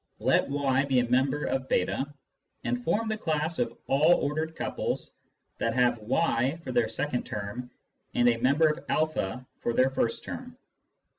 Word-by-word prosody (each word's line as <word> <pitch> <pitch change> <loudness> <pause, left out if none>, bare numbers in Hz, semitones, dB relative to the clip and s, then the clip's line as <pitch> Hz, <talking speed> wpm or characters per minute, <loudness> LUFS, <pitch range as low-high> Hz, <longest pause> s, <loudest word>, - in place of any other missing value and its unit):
Let - - +2
y 135 -1 +2
be 135 -2 +1
a 125 -1 +3
member 130 +4 +2
of 130 0 -2
j8, 140 +2 0 0.5
and 120 +1 -1
form 210 - +1
the 220 -1 -2
class 160 -1 -1
of 120 -1 -1
all 150 +5 +5
ordered 155 +2 -2
couples - - -3 0.5
that 115 0 0
have 120 -2 +3
y 130 +4 +1
for - - -4
their 240 - +2
second 145 -4 -2
term 105 +5 -5 0.5
and 120 - +4
a 120 -1 +4
member 150 +6 +3
of 155 0 +1
a 125 +7 -3
for 120 - -1
their 130 +2 +3
first 115 -3 -1
term. - - -7
135 Hz, 165 wpm, -28 LUFS, 120-155 Hz, 0.5 s, all